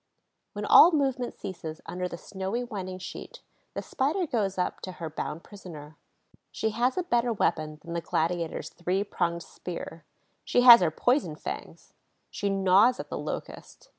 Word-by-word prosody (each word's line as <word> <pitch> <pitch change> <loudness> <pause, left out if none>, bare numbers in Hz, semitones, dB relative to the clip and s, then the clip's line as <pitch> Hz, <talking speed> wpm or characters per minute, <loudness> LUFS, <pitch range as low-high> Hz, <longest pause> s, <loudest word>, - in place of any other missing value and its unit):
When - - -4
all 345 - +9
movement 270 -5 0
ceases 160 -4 -7
under 180 0 -3
the 170 - -7
snowy 195 +7 -4
winding 190 -5 -5
sheet, 185 - -9 0.3
the - - -3
Spider 315 +8 0
goes 205 - -1
up 180 - -2
to 185 - -6
her 165 -3 -6
bound 155 +1 -5
prisoner. 160 -7 -11 0.6
She 220 - -1
has 245 +6 0
a 365 - +1
better 240 -6 +1
weapon 155 -7 0
than 170 0 -7
the 170 - -2
gladiator's 165 0 -1
three 180 +3 -1
pronged 170 -4 -2
spear: 165 -2 -8 0.4
she 245 - +2
has 240 -3 +10
her 175 - +3
poison 245 - +1
fangs. - - -8 0.4
She 205 - -2
gnaws 195 +5 +4
at - - -6
the - - -4
Locust. - - -7
190 Hz, 165 wpm, -28 LUFS, 170-240 Hz, 0.6 s, has